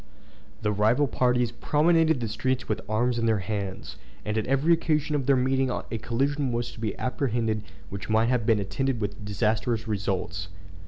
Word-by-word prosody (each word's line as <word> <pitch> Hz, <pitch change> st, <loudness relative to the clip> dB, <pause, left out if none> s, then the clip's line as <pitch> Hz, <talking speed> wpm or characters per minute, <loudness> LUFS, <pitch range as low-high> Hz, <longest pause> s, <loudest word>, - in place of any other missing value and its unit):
The 105 Hz, -, +2 dB
rival 110 Hz, +7 st, +3 dB
parties 125 Hz, -2 st, +1 dB
promenaded 160 Hz, +3 st, +3 dB
the 115 Hz, -, -1 dB
streets 130 Hz, +4 st, -1 dB
with -, -, -1 dB
arms 120 Hz, +2 st, +1 dB
in 115 Hz, -, +1 dB
their 110 Hz, -1 st, +3 dB
hands; 100 Hz, -2 st, -4 dB, 0.3 s
and 105 Hz, -, -1 dB
at 110 Hz, -, -1 dB
every 135 Hz, +6 st, +3 dB
occasion 155 Hz, -2 st, +1 dB
of 140 Hz, -2 st, -1 dB
their 140 Hz, -, +5 dB
meeting 130 Hz, +1 st, +1 dB
a -, -, -2 dB, 0.2 s
collision 135 Hz, +4 st, 0 dB
was 120 Hz, 0 st, -2 dB
to -, -, -13 dB
be 110 Hz, -3 st, -3 dB
apprehended 115 Hz, -4 st, -1 dB, 0.3 s
which 100 Hz, +2 st, -6 dB
might 110 Hz, +2 st, +3 dB
have 125 Hz, -2 st, +1 dB
been 110 Hz, -1 st, +3 dB
attended 130 Hz, +5 st, -1 dB
with 105 Hz, 0 st, -4 dB
disastrous 110 Hz, +2 st, 0 dB
results. 95 Hz, -5 st, -2 dB
115 Hz, 175 wpm, -26 LUFS, 110-135 Hz, 0.3 s, their